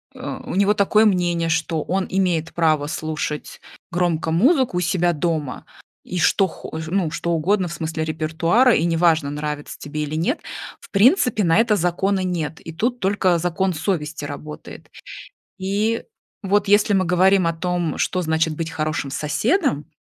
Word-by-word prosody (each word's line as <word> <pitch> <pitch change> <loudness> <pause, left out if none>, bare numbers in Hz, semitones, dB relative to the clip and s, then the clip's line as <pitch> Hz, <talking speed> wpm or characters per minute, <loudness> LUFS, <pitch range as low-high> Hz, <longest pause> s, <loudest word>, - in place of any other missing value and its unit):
э, - - -12 0.2
у - - -5
него 200 +1 +3
такое 210 +1 +3
мнение, 175 -4 +1
что 160 -1 0
он 190 +1 -1
имеет 175 -4 0
право 155 -3 +2
слушать 155 -1 -4 0.3
громко 170 -2 0
музыку 255 - +3
у - - +2
себя 175 0 +1
дома, 155 -4 -2 0.4
и 180 - -5
что 190 +3 +3
хо 160 -2 -8
ну, 175 -2 0
что 170 +1 -2
угодно 185 +4 +1
в 170 - -6
смысле 160 -1 -3
репертуара, 165 - +2
и 165 - +1
неважно, 165 -3 +2
нравится 150 0 -5
тебе 150 +1 -5
или 150 0 -3
нет, 180 - 0 0.4
в - - -15
принципе, 230 - +3
на 165 +1 +3
это 225 -2 +3
закона 190 +2 0
нет. 165 -4 -3
И 165 - -9
тут 240 +7 -1
только 190 -2 +2
закон 180 +2 0
совести 155 -2 -2
работает. 150 +1 -9 0.7
И 205 +4 0 0.4
вот 200 +1 +1
если 205 0 +4
мы 190 -2 +2
говорим 185 +1 +3
о 165 - +1
том, 175 -1 -2
что 185 - 0
значит 160 -1 0
быть 165 0 -3
хорошим 155 -2 -2
соседом, 150 - 0
170 Hz, 160 wpm, -21 LUFS, 160-195 Hz, 0.7 s, если